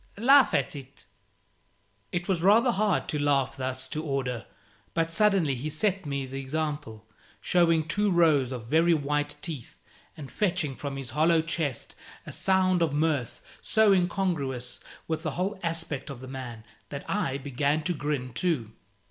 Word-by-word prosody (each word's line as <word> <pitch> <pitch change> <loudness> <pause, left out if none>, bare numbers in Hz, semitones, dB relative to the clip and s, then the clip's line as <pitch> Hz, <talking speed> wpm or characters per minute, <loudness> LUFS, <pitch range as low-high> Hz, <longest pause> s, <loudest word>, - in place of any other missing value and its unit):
Laugh 265 +4 +6
at - - 0
it." 135 -1 -11 1.1
It 175 0 -2
was 185 -4 0
rather 220 +7 +5
hard 210 -3 +1
to 150 - -1
laugh 140 -3 +1
thus 130 -1 -2
to 155 - -3
order; 135 -5 -2 0.5
but 165 0 +1
suddenly 190 -5 +3
he 130 +4 -4
set 185 +3 0
me 140 -1 -2
the 135 +1 -6
example, 145 -6 -4 0.3
showing 165 -3 +2
two 205 +5 +1
rows 155 -8 +3
of 125 -4 -5
very 165 +6 +4
white 145 0 -1
teeth, 150 -9 -6 0.4
and 145 -4 -8
fetching 175 -9 0
from 140 0 -5
his 130 -3 -6
hollow 160 +3 +3
chest 160 -6 -3 0.3
a - - -7
sound 185 -2 +2
of 160 -4 +1
mirth 150 -5 -1 0.2
so 220 -2 +4
incongruous 170 -10 -1 0.3
with 160 -1 -2
the 160 -2 -2
whole 190 +2 -1
aspect 165 -4 -3
of 135 -3 -7
the 130 - -9
man, 125 -4 -7 0.3
that 140 -1 -7
I 140 -10 -1
began 140 +3 -1
to 175 +2 0
grin 145 -5 -3
too. 120 -5 -1
150 Hz, 160 wpm, -27 LUFS, 135-175 Hz, 1.1 s, Laugh